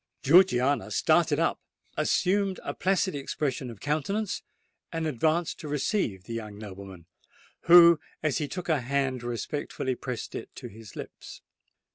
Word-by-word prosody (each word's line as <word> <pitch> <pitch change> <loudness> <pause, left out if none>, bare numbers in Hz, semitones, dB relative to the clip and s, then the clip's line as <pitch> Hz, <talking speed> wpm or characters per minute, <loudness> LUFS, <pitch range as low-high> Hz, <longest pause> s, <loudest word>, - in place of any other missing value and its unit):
Georgiana 145 -4 +4
started - - +2
up—assumed 195 0 -1
a - - -4
placid 190 0 +1
expression 135 -2 -3
of 115 -4 -10
countenance—and 165 +1 -4
advanced 155 +4 0
to 155 - -7
receive 145 - -1
the 115 - -8
young 110 -3 -6
nobleman, 95 -4 -10 0.6
who, 170 -1 +8 0.2
as 155 -5 +1
he 150 - -2
took 180 +3 -6
her 155 -5 +1
hand, 130 0 -1
respectfully 130 +2 -3
pressed 125 -2 -6
it - - -6
to - - -8
his 110 0 -13
lips. - - -10
145 Hz, 130 wpm, -27 LUFS, 120-170 Hz, 0.6 s, who